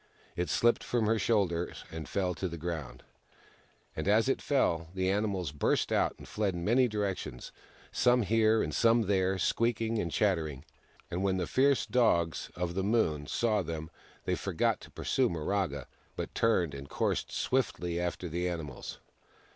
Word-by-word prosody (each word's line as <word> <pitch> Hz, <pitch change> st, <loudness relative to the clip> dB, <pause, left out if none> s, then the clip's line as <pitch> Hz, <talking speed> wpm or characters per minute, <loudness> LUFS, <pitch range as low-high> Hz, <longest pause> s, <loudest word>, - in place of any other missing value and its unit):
It 90 Hz, 0 st, -1 dB
slipped 120 Hz, 0 st, +3 dB
from 120 Hz, -2 st, 0 dB
her 110 Hz, +1 st, +2 dB
shoulders, 95 Hz, -5 st, 0 dB
and 80 Hz, -2 st, -6 dB
fell 95 Hz, -2 st, 0 dB
to 95 Hz, +3 st, -3 dB
the 85 Hz, -1 st, -6 dB
ground; 80 Hz, -4 st, -5 dB, 0.9 s
and 80 Hz, -, -3 dB
as 110 Hz, +4 st, +4 dB
it 135 Hz, -, +1 dB
fell, 85 Hz, -, +1 dB
the 95 Hz, 0 st, +1 dB
animals 100 Hz, -6 st, -1 dB
burst 75 Hz, -, +1 dB
out -, -, +2 dB
and -, -, -12 dB
fled 105 Hz, -4 st, -1 dB
in 85 Hz, 0 st, -4 dB
many 125 Hz, +4 st, +4 dB
directions, 100 Hz, -, -3 dB, 0.4 s
some 125 Hz, -1 st, +3 dB
here 110 Hz, +2 st, +3 dB
and -, -, -3 dB
some 115 Hz, 0 st, +4 dB
there, 95 Hz, -1 st, +1 dB
squeaking 115 Hz, +3 st, +1 dB
and 85 Hz, -4 st, -2 dB
chattering. 80 Hz, -10 st, 0 dB, 0.5 s
And 90 Hz, -, -2 dB
when 95 Hz, -1 st, +1 dB
the 90 Hz, -, 0 dB
fierce 135 Hz, +5 st, +3 dB
Dogs 85 Hz, -10 st, +2 dB
of 90 Hz, -1 st, -2 dB
the 95 Hz, +1 st, -1 dB
Moon 85 Hz, -9 st, +1 dB
saw 110 Hz, -3 st, +1 dB
them, 80 Hz, -2 st, -5 dB, 0.3 s
they -, -, +1 dB
forgot -, -, 0 dB
to -, -, -12 dB
pursue -, -, +1 dB
Miraga, 80 Hz, -4 st, -1 dB, 0.3 s
but -, -, -5 dB
turned 90 Hz, -9 st, +2 dB
and 70 Hz, 0 st, -8 dB
coursed -, -, -1 dB
swiftly 90 Hz, -10 st, -1 dB
after 90 Hz, +1 st, -2 dB
the 90 Hz, +2 st, -1 dB
animals. 80 Hz, -7 st, -6 dB
95 Hz, 165 wpm, -31 LUFS, 85-110 Hz, 0.9 s, as